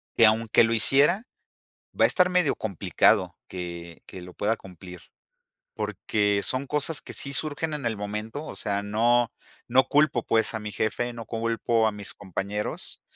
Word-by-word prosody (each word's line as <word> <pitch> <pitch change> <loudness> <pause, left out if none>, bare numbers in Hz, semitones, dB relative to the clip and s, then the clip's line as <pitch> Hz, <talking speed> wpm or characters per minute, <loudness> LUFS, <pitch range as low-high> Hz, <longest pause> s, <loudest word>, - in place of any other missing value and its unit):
que 115 - +6
aunque 110 +1 +4
lo 115 0 +1
hiciera, 145 - +4 0.8
va - - +5
a - - +9
estar 180 -1 +3
medio 180 -5 +2
complicado 95 -1 +1
que, 85 -2 -7
que 95 - -9
lo 90 0 -11
pueda 110 +2 0
cumplir. 90 -1 -12 0.7
Porque 105 - -1
son 130 +2 -1
cosas 150 +2 0
que - - -8
sí 140 - 0
surgen 155 +2 0
en 145 -4 -5
el 115 -1 -1
momento. 105 +7 -5
O - - -8
sea, 100 -2 -2
no, 115 +3 +2 0.4
no 130 +1 +4
culpo, 140 -3 +2
pues, 115 0 +2
a 110 - -3
mi 105 0 -6
jefe, 120 +3 -2
no 115 -1 -8
culpo 115 0 0
a - - 0
mis 105 -1 -4
compañeros. 100 +2 -5
110 Hz, 170 wpm, -26 LUFS, 100-130 Hz, 0.8 s, a